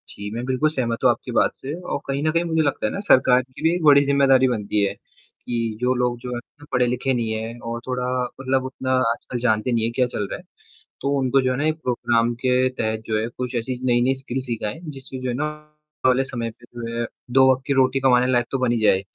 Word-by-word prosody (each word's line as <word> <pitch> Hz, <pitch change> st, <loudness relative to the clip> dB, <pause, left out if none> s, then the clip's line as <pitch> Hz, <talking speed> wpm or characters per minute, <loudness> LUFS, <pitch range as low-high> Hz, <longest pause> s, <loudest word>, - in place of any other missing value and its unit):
जी, 100 Hz, 0 st, -7 dB
मैं 120 Hz, -, -3 dB
बिल्कुल 130 Hz, +4 st, +1 dB
सहमत 120 Hz, -6 st, -2 dB
हूँ -, -, +6 dB
आपकी -, -, -5 dB
बात -, -, +3 dB
से 135 Hz, +2 st, -6 dB
और 180 Hz, -, -3 dB
कहीं 140 Hz, +1 st, -1 dB
न 155 Hz, -, +2 dB
कहीं 165 Hz, +2 st, +1 dB
मुझे 160 Hz, -2 st, +1 dB
लगता 140 Hz, -7 st, 0 dB
है 105 Hz, -, 0 dB
ना -, -, -3 dB
सरकार 130 Hz, -1 st, +5 dB
की 130 Hz, +2 st, -14 dB
भी 165 Hz, +1 st, +4 dB
एक 175 Hz, -, -3 dB
बड़ी 145 Hz, -2 st, +7 dB
ज़िम्मेदारी 135 Hz, -2 st, +4 dB
बनती 105 Hz, -4 st, 0 dB
है 100 Hz, -, 0 dB, 0.5 s
कि 115 Hz, -2 st, -2 dB
जो 125 Hz, +1 st, +2 dB
लोग 125 Hz, -1 st, 0 dB
जो 125 Hz, 0 st, -6 dB
है 145 Hz, +4 st, -11 dB
पढ़े-लिखे 125 Hz, +1 st, +1 dB
नहीं 115 Hz, -3 st, -1 dB
हैं 110 Hz, +2 st, -4 dB
और 115 Hz, 0 st, -5 dB
थोड़ा 125 Hz, -1 st, -1 dB, 0.3 s
मतलब 130 Hz, 0 st, 0 dB
उतना 130 Hz, 0 st, -4 dB, 0.2 s
आजकल 120 Hz, +1 st, -5 dB
जानते 110 Hz, 0 st, +1 dB
नहीं 115 Hz, -2 st, +1 dB
हैं 115 Hz, -, 0 dB
क्या 130 Hz, -, +3 dB
चल 105 Hz, -4 st, -3 dB
रहा -, -, -3 dB
है। -, -, -15 dB, 0.6 s
तो 140 Hz, -, 0 dB
उनको 135 Hz, +1 st, +2 dB
जो 130 Hz, 0 st, +1 dB
है 125 Hz, -, -1 dB
ना 145 Hz, -, 0 dB
एक 155 Hz, -, +1 dB
प्रोग्राम 120 Hz, -1 st, +1 dB
के 130 Hz, 0 st, +3 dB
तहत 110 Hz, -3 st, -2 dB
जो 110 Hz, -, 0 dB
है 110 Hz, -, -1 dB
कुछ 125 Hz, 0 st, -4 dB
ऐसी 125 Hz, +2 st, -2 dB
नई-नई 125 Hz, +1 st, +3 dB
स्किल्स 130 Hz, 0 st, -4 dB
सिखाएँ। 115 Hz, 0 st, -3 dB
जिससे 135 Hz, -4 st, -8 dB
जो 130 Hz, 0 st, -3 dB
है 120 Hz, -, -1 dB
ना 145 Hz, +4 st, -1 dB, 0.6 s
वाले 130 Hz, +1 st, +4 dB
समय 120 Hz, -3 st, -4 dB
पे 120 Hz, +2 st, -19 dB
जो 115 Hz, 0 st, -4 dB
है 120 Hz, -, 0 dB, 0.3 s
दो 130 Hz, +1 st, +6 dB
वक़्त 130 Hz, 0 st, -1 dB
की 140 Hz, -, +2 dB
रोटी 130 Hz, 0 st, +3 dB
कमाने 125 Hz, -2 st, +4 dB
लायक 120 Hz, -1 st, +2 dB
तो 135 Hz, -, 0 dB
बन 125 Hz, -2 st, +1 dB
ही 120 Hz, -, +1 dB
जाए। 100 Hz, -3 st, +4 dB
125 Hz, 250 wpm, -22 LUFS, 120-135 Hz, 0.6 s, बड़ी